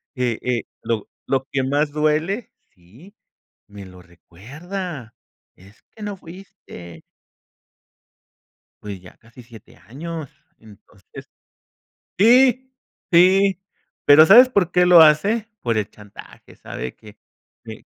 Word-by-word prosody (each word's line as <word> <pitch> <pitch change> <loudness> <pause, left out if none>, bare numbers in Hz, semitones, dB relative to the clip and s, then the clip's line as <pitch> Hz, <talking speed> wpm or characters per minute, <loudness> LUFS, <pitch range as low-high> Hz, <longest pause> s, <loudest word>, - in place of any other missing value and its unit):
e 125 -3 -2
e 125 -3 -2 0.2
lo 115 -3 -4 0.2
lo 135 -1 -1
que 135 - -1
más 145 +3 -1
duele 155 +9 -2 0.2
sí, 110 - -20 0.6
me 100 -2 -12
lo 90 -1 -15
recuerda: 125 - -10 0.4
"Es 95 +3 -21
que 220 - -14
no 205 -1 -6
fuiste". 165 - -14 1.8
Pues 100 -3 -8
ya 90 - -17
casi 120 +2 -18
7 115 -2 -17
años, 155 +4 -9 0.3
entonces 105 -2 -17 0.9
sí, 255 +4 +3 0.4
sí, 190 +2 +3 0.4
pero, 150 +2 +7
¿sabes 245 +8 +7
por 190 -8 -1
qué 180 0 +3
lo 175 -2 +7
hace?, 200 +9 +2 0.2
por 115 -2 -2
el 105 - -3
chantaje, 105 -1 -16
sabe 65 - -8
que 105 -1 -17 0.5
que - - -11
145 Hz, 115 wpm, -20 LUFS, -, 1.8 s, pero